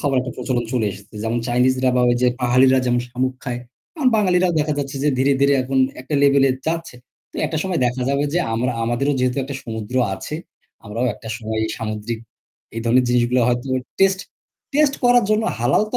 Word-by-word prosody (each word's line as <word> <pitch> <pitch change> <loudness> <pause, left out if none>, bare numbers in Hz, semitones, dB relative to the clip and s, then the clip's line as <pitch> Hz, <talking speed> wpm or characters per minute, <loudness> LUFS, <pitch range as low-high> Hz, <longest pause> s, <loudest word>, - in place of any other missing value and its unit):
খাবার 140 -2 0
একটা 125 -1 -5
প্রচলন 120 -3 -1
চলে 120 -4 +1
এসেছে। 100 +3 -14
যেমন 115 +2 -1
চাইনিজরা 130 +1 +2
বা - - +3
ওই 120 - +3
যে 125 - +5
পাহাড়ীরা 130 +2 +4
যেমন 120 0 +2
শামুক 130 +1 -1
খায়, 120 -2 -3 0.4
এখন 275 -5 +3
বাঙালিরাও 185 -3 +2
দেখা 150 0 +1
যাচ্ছে 140 0 -3
যে - - +4
ধীরে, 135 +2 +3
ধীরে, 140 0 +4
এখন 130 +1 -1 0.2
একটা 135 +4 -5
level 140 -1 +5
এ - - +3 0.2
যাচ্ছে। 165 -3 -2 0.4
তো - - -12
একটা 160 +1 -2
সময় 185 -3 -1
দেখা 125 +1 -2
যাবে 140 +1 +1
যে 175 - +3 0.2
আমরা 125 +2 0
আমাদেরও 120 +5 0
যেহেতু 125 -1 0
একটা 140 +1 -6
সমুদ্র 110 -1 -6 0.2
আছে, 150 - -7 0.5
আমরাও 115 +4 -2
একটা 110 - -11
সময় 110 -1 -4
এই 110 - -3
সামুদ্রিক 110 +1 -4 0.6
এই 115 - -3
ধরনের 125 +2 +4
জিনিসগুলা 125 0 +2
হয়তো 120 +2 -1 0.3
টেস্ট 190 -1 +4 0.5
টেস্ট 295 -2 +3
করার 245 -2 +5
জন্য 215 +1 +3 0.2
হালাল 120 - +2
তো - - +1
130 Hz, 200 wpm, -21 LUFS, 120-145 Hz, 0.6 s, যে